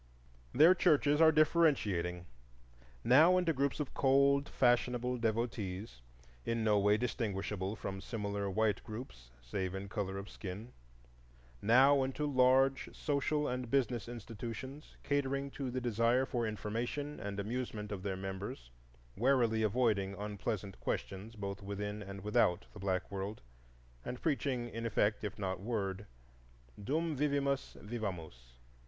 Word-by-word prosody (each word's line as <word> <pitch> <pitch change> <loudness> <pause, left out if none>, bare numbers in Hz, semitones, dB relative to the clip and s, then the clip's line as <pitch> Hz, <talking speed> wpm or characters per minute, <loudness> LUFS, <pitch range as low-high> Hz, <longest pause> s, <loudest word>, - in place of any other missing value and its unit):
Their 160 +6 +7
churches 150 -4 +3
are 160 -1 +8
differentiating,—now 90 - +2
into 175 -3 +2
groups 140 +1 0
of 150 - -3
cold, 140 +1 +3
fashionable 125 0 +2
devotees, 110 - -2 0.4
in 115 -1 -1
no 105 -2 +4
way 105 +1 +4
distinguishable 105 -4 -2
from 95 -2 -5
similar 100 -1 -3
white 105 0 +1
groups 105 - -9
save 95 +9 -3
in 95 +1 -5
color 95 -1 -3
of 100 +1 -6
skin; 105 +5 -8 0.9
now 135 +5 +6
into 135 +3 -1
large 135 0 +3
social 150 0 0
and 125 -1 -3
business 120 -4 0
institutions 120 +5 -7
catering 140 -1 -1
to 135 -2 -4
the 130 +1 -2
desire 120 +2 +2
for 120 -3 -1
information 120 +7 -3
and 100 0 -4
amusement 105 -1 -4
of 100 -2 -4
their 95 -1 -3
members, 95 -10 -6 0.4
warily 120 -2 +3
avoiding 105 -3 +1
unpleasant 105 -1 -4
questions 100 +4 -4
both 100 -1 -5
within 105 +1 -4
and 100 0 -7
without 100 -3 +2
the 105 - -10
black 95 -1 -1
world, 100 +2 -4 0.6
and 125 0 -5
preaching 130 -5 -1
in 115 -1 -6
effect 105 -2 +1
if 105 0 -4
not 95 -3 -2
in 100 - -10
word: 100 -3 -2 0.8
Dum 160 +6 0
vivimus, 140 -1 0
vivamus. 90 - -6
110 Hz, 130 wpm, -34 LUFS, 100-130 Hz, 0.9 s, are